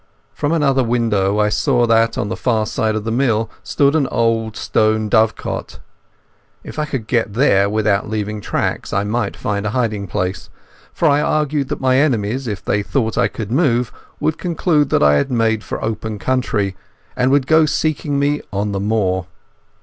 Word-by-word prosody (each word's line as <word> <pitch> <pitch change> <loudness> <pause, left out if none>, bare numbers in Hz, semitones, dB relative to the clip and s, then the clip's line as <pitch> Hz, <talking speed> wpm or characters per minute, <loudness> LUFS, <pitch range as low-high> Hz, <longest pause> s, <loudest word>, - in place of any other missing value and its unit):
From 145 - -2
another 140 -5 +2
window 110 -4 +1
I 105 0 +2
saw 120 +4 +2
that 115 0 +2
on - - -1
the - - -3
far 110 -4 0
side 110 0 -1
of 110 - -2
the 115 - -3
mill 115 -3 +1
stood 140 +8 +1
an 145 -4 +2
old 115 -2 0
stone 110 0 +1
dovecot. 110 -1 0 0.9
If - - -7
I 150 - 0
could 135 -7 -4
get 115 -3 0
there 100 -5 +3
without 105 -1 0
leaving 105 -1 -3
tracks - - -2
I 100 - +1
might 115 +4 -2
find 100 -1 -2
a 105 - -1
hiding 105 -5 -1
place, 90 +1 -3 0.4
for 165 - +1
I 145 0 +3
argued 150 -2 0
that - - -3
my 130 0 +3
enemies, 130 -3 0
if 105 -4 -5
they 105 - +1
thought 110 +1 -1
I - - +3
could 110 -2 -6
move, 125 -4 +1 0.3
would 155 - -1
conclude 165 -4 +1
I 75 0 +4
had 70 - 0
made 115 -3 +1
for - - -5
open 110 -1 -3
country, 105 -5 -1 0.4
and 125 - +2
would 140 -1 +3
go 160 +1 +4
seeking 150 -1 -1
me 145 +1 +1
on 100 +1 -2
the 100 - -2
moor. 95 -3 0
115 Hz, 180 wpm, -18 LUFS, 105-135 Hz, 0.9 s, I